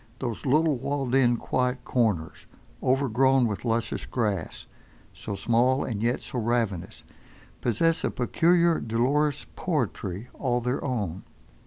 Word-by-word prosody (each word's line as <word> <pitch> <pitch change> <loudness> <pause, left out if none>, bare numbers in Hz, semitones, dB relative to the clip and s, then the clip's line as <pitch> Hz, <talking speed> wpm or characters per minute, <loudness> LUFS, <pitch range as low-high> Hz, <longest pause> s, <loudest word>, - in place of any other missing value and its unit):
Those 120 0 -4
little 150 +1 +3
walled 135 0 -2
in, 120 -3 +4
quiet 125 0 -1
corners, 105 -11 -1 0.3
overgrown 130 0 +3
with 105 -3 -3
luscious 115 -1 -1
grass, 105 -6 -2 0.5
so 100 - -5
small, 120 +6 +2
and 110 -4 -3
yet 120 +3 0
so 125 - -5
ravenous, 115 -6 -1 0.6
possess 160 +8 +1
a - - +1
peculiar 170 +6 +2
dolorous 140 +6 0
poetry 120 - -2
all 125 -3 0
their 125 +2 -2
own. 100 - -2
125 Hz, 125 wpm, -26 LUFS, 115-135 Hz, 0.6 s, in